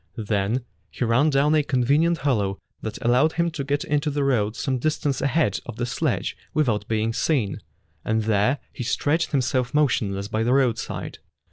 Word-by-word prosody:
Then 110 +3 -1 0.2
he 125 - -2
ran 125 +7 +3
down 145 +1 +3
a 155 - +4
convenient 145 +5 +2
hollow 100 -8 +1 0.2
that 110 - -5
allowed 125 +7 +4
him 170 0 0
to 155 -3 -4
get 140 +1 -1
into 150 +1 0
the 145 0 -1
road 115 -6 +1
some 130 +1 -1
distance 145 -1 -1
ahead 140 - +1
of - - -6
the 120 - -2
sledge 135 +2 -1 0.2
without 115 -9 +1
being 110 0 0
seen, 120 - 0 0.4
and 110 0 0
there 110 +5 +2 0.2
he - - -5
stretched 150 +7 0
himself 130 -1 0
motion 120 -9 +2
less 100 +1 -4
by 110 +1 -1
the 120 +3 +2
roadside. 130 -4 -1
130 Hz, 175 wpm, -24 LUFS, 110-145 Hz, 0.4 s, a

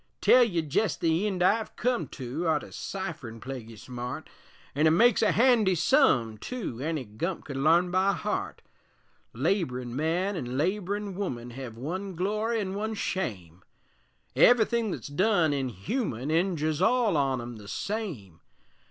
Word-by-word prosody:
Tell 250 - +6
ye 175 -8 0
jest 160 +5 0
the 165 +5 +1
eend 185 -3 -1
I've 215 +4 +1
come 245 0 0
to 135 +6 -4
Arter 155 -2 0
cipherin' 165 -12 -6
plaguy 120 -2 -7
smart, 125 +3 -7 0.4
An' 150 +3 +3
it - - +6
makes 220 +8 +4
a 220 - +4
handy 225 -6 +4
sum, 135 - +3
tu, 215 - -5
Any 155 -2 -2
gump 160 - -4
could 140 - -6
larn 165 +6 +3
by 190 +2 +3
heart; 210 +1 -3 0.7
Laborin' 125 - -1
man 170 +7 0
an' 130 -6 -4
laborin' 200 +4 -1
woman 125 -12 -4
Hev 120 -2 -8
one 185 +9 -4
glory 215 +6 0
an' 190 -2 -3
one 215 +2 -3
shame. 95 - -4 0.7
Ev'ythin' 235 -2 +4
thet's - - -5
done 170 0 +2
inhuman 135 - -3
Injers 160 -2 0
all 230 -1 +3
on 135 -3 +1
'em 120 -1 -7
the 105 -1 -12
same. 145 - -5
170 Hz, 145 wpm, -28 LUFS, 130-205 Hz, 0.7 s, Tell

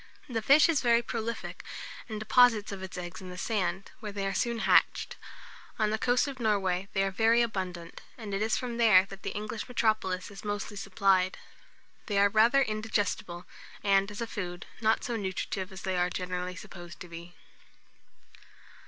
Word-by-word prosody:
The 230 -5 -2
fish 280 +7 +6
is 330 -4 +2
very 235 -1 +4
prolific, 230 -1 -4 0.5
and 215 -1 -4
deposits 220 -1 +4
of 195 -1 -6
its 190 -1 -7
eggs 180 +1 -6
in 185 - -8
the 180 - -8
sand, 190 -2 -2
where 210 -2 -6
they 200 -1 -3
are 195 - -1
soon 235 +4 0
hatched. - - +3 0.6
On 215 -2 +1
the 220 - -1
coast 245 +3 +2
of 270 -2 -6
Norway, 195 -4 +1
they 195 - +2
are 195 - 0
very 225 +4 +4
abundant, 185 -6 -4 0.2
and 215 -4 -7
it 195 - -1
is 220 +1 +1
from 240 -2 -4
there 215 -5 +6
that 195 0 -11
the - - -3
English 210 +1 -4
metropolis 215 -6 0
is 200 - -10
mostly 205 0 -3
supplied. 195 -1 +2 0.7
They 205 - 0
are 200 0 +5
rather 230 +6 +5
indigestible, 215 -5 -2 0.4
and, 195 0 +3
as 210 +2 -7
a - - 0
food, 180 -5 -5 0.2
not 220 0 +2
so 240 -2 -2
nurtritive 190 -1 -3
as 190 - -9
they 190 -1 -1
are 180 0 +2
generally 180 0 -4
supposed 175 -3 -10
to 180 - -7
be. 170 +1 -10
205 Hz, 180 wpm, -29 LUFS, 185-225 Hz, 0.7 s, fish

